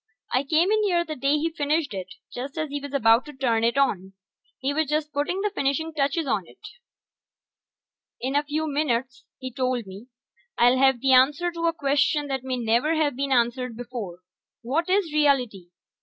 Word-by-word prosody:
I 255 Hz, -, +3 dB
came 320 Hz, +7 st, +2 dB
in 435 Hz, 0 st, +3 dB
here 350 Hz, -4 st, +1 dB
the 310 Hz, -, -5 dB
day 275 Hz, +2 st, +1 dB
he 325 Hz, +2 st, -1 dB
finished 295 Hz, -3 st, -1 dB
it, 190 Hz, -1 st, -7 dB, 0.2 s
just 270 Hz, +5 st, -6 dB
as 310 Hz, -1 st, -2 dB
he 290 Hz, -, -2 dB
was 285 Hz, 0 st, -8 dB
ready 230 Hz, -4 st, +4 dB
to 295 Hz, -, -11 dB
turn 240 Hz, -4 st, 0 dB
it 235 Hz, +3 st, +1 dB
on. 195 Hz, -9 st, 0 dB, 0.4 s
He 270 Hz, +2 st, -2 dB
was 315 Hz, 0 st, 0 dB
just 300 Hz, 0 st, -1 dB
putting 295 Hz, +7 st, -1 dB
the 415 Hz, 0 st, -1 dB
finishing 320 Hz, 0 st, -1 dB
touches 295 Hz, +2 st, 0 dB
on 205 Hz, -9 st, -1 dB
it. -, -, -18 dB, 1.6 s
"In 265 Hz, +2 st, -3 dB
a 290 Hz, -, +4 dB
few 300 Hz, +2 st, -2 dB
minutes," 260 Hz, -4 st, -2 dB
he 260 Hz, -2 st, -7 dB
told 255 Hz, -2 st, -1 dB
me, 195 Hz, +5 st, -11 dB, 0.5 s
"I'll 245 Hz, +2 st, +4 dB
have 265 Hz, -3 st, +3 dB
the 270 Hz, -, +2 dB
answer 290 Hz, +7 st, +4 dB
to 335 Hz, 0 st, -2 dB
a 330 Hz, -, +1 dB
question 290 Hz, 0 st, +1 dB
that 265 Hz, -2 st, -2 dB
may 260 Hz, -1 st, -2 dB
never 240 Hz, +7 st, +1 dB
have 300 Hz, -4 st, +1 dB
been 275 Hz, +1 st, -2 dB
answered 240 Hz, -1 st, 0 dB
before: 235 Hz, -8 st, -7 dB, 0.4 s
what 310 Hz, +9 st, -1 dB
is 375 Hz, -5 st, +1 dB
reality? 255 Hz, -11 st, +1 dB
275 Hz, 190 wpm, -25 LUFS, 245-305 Hz, 1.6 s, ready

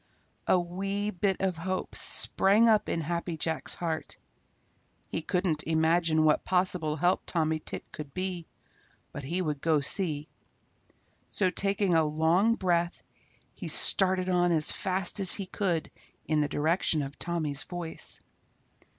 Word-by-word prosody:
A 185 Hz, -, +4 dB
wee 195 Hz, +4 st, -3 dB
bit 190 Hz, 0 st, -1 dB
of 190 Hz, -3 st, -1 dB
hope 185 Hz, +3 st, -4 dB
sprang 210 Hz, +4 st, +4 dB
up 215 Hz, -2 st, +3 dB
in 165 Hz, -, -1 dB
Happy 170 Hz, +1 st, -3 dB
Jack's 160 Hz, 0 st, -1 dB
heart. 165 Hz, -2 st, -4 dB, 0.9 s
He -, -, -3 dB
couldn't 170 Hz, -2 st, -1 dB
imagine 160 Hz, 0 st, +1 dB
what 155 Hz, -1 st, +2 dB
possible 180 Hz, -4 st, 0 dB
help 175 Hz, +4 st, +1 dB
Tommy 160 Hz, -2 st, 0 dB
Tit -, -, -7 dB
could 150 Hz, -2 st, -9 dB
be, 185 Hz, 0 st, -4 dB, 0.6 s
but 140 Hz, -, -7 dB
he 175 Hz, +7 st, -2 dB
would 150 Hz, -4 st, -3 dB
go 160 Hz, -2 st, +2 dB
see. 150 Hz, 0 st, 0 dB, 1.0 s
So 185 Hz, -3 st, +1 dB
taking 200 Hz, -1 st, 0 dB
a 160 Hz, -1 st, +4 dB
long 160 Hz, +9 st, +2 dB
breath 175 Hz, -4 st, -1 dB, 0.5 s
he -, -, -8 dB
started 185 Hz, -1 st, +4 dB
on 175 Hz, -1 st, +2 dB
as 155 Hz, -2 st, +1 dB
fast 190 Hz, 0 st, -1 dB
as 190 Hz, -2 st, +7 dB
he 200 Hz, -, -5 dB
could 180 Hz, -4 st, -2 dB, 0.3 s
in 155 Hz, -1 st, +1 dB
the 145 Hz, -, 0 dB
direction 155 Hz, 0 st, 0 dB
of 140 Hz, +1 st, -9 dB
Tommy's 155 Hz, -5 st, -2 dB
voice. 170 Hz, +1 st, -5 dB
175 Hz, 140 wpm, -28 LUFS, 155-185 Hz, 1.0 s, as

